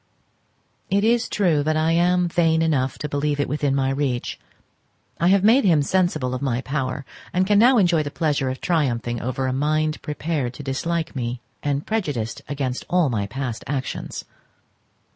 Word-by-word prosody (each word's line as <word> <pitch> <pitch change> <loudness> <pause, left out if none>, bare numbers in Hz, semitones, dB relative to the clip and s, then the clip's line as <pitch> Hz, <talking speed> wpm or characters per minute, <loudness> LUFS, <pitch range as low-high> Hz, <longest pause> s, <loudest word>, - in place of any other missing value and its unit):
It 200 +1 +2
is 235 +1 +2
true 170 -8 +2
that 155 +2 0
I 160 +1 +2
am 175 +1 +3
vain 165 -1 +2
enough 135 -5 0
to 150 - -4
believe 145 0 -1
it 145 - +1
within 145 -1 0
my 135 -1 +1
reach. 135 -3 -2 0.8
I 170 - +3
have 195 +1 +4
made 230 +6 +5
him 160 -7 +4
sensible 155 -7 0
of 130 - -3
my 130 -3 0
power, 135 0 -3 0.3
and 185 +1 +2
can 205 +1 +4
now 245 +3 +6
enjoy 175 -6 +4
the 145 - -3
pleasure 145 -4 0
of 130 - -4
triumphing 120 -8 0
over 130 +2 -2
a 130 - 0
mind 155 +3 0
prepared 150 -4 -3
to 145 - -8
dislike 160 +5 -2
me, 120 -1 -3 0.2
and 145 0 -1
prejudiced 145 - -2
against 135 -3 -2
all 175 -5 +3
my 100 -3 -1
past 125 +1 -4
actions. 135 -2 -4
145 Hz, 175 wpm, -23 LUFS, 130-170 Hz, 0.8 s, now